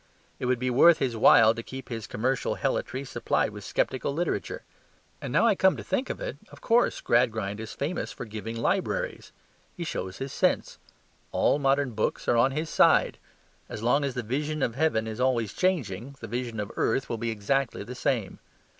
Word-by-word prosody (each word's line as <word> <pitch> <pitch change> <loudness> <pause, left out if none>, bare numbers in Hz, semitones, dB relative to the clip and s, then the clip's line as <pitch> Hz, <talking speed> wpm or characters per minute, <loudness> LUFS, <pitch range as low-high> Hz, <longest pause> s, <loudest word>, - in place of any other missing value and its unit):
It 125 - -2
would 125 0 +2
be 125 +1 -1
worth 165 +7 +6
his 125 -4 -1
while 110 0 +6
to 115 - -6
keep 130 +2 -9
his 115 -3 -5
commercial 130 +4 -1
helotry 130 +3 -2
supplied - - 0
with - - -9
sceptical 130 +1 -1
literature. 175 - -2 0.6
And - - -5
now - - +3
I 225 - +5
come 190 0 +3
to - - -6
think 260 - -1
of - - -4
it, - - -5
of - - -14
course, 240 +1 +2
Gradgrind 110 -4 +1
is 110 0 -6
famous 155 +6 -3
for - - -7
giving 110 +1 -6
libraries. 115 - -1 0.5
He 175 - -3
shows 95 - -4
his 135 0 -5
sense. - - 0 0.5
All - - +2
modern 140 -1 +2
books 110 -1 -2
are - - +3
on 120 +3 +4
his 155 +4 -3
side. - - +4 0.5
As 105 - -6
long 140 +5 +3
as 140 -3 -2
the 125 - -2
vision 145 +5 -2
of 115 - 0
heaven 130 -5 +1
is 110 +1 -6
always 120 -5 +1
changing, 140 - -1
the - - -7
vision 120 -1 -4
of 105 - -4
earth 130 +4 +1
will 115 - -3
be 115 0 -2
exactly 115 +3 -1
the 120 +5 -8
same. 120 -5 -2
125 Hz, 195 wpm, -27 LUFS, 110-140 Hz, 0.6 s, worth